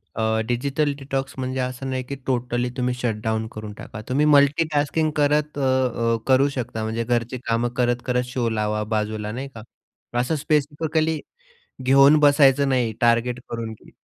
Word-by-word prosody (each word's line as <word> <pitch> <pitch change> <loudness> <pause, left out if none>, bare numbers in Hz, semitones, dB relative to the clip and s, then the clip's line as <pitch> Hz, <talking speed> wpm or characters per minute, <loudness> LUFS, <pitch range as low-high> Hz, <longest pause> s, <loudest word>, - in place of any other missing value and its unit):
अ, 110 0 +1
digital 140 +4 0
detox 135 0 -3
म्हणजे 130 0 -3
असं 130 +1 -3
नाही 130 -1 -2
की 140 - -6
टोटली 125 -1 -1
तुम्ही 125 0 0
शट 115 -4 -2
डाउन 110 0 -1
करून 105 -1 -7
टाका. 105 +1 -9
तुम्ही 145 +4 +2
मल्टी 145 +3 +4
टास्किंग 150 +2 +1
करत 150 0 +1
अ, 140 - -2
अ, 125 -3 +1
करू 135 +2 +5
शकता. 115 -3 -3
म्हणजे 115 +1 -2
घरची 120 +1 -1
कामं 115 +1 +1
करत, 120 0 +1
करत 125 -1 +1
शो 120 -3 0
लावा 105 -1 -1
बाजूला 105 0 -2
नाही 130 +5 -5
का? 110 - -9 0.6
असं 125 +6 0
स्पेसिफिकली 155 +1 0 0.6
घेऊन 135 +3 +6
बसायचं 140 -1 +5
नाही 125 -4 +1
टार्गेट 120 +1 +2
करून 115 -1 -4
की - - -19
125 Hz, 165 wpm, -23 LUFS, 115-140 Hz, 0.6 s, घेऊन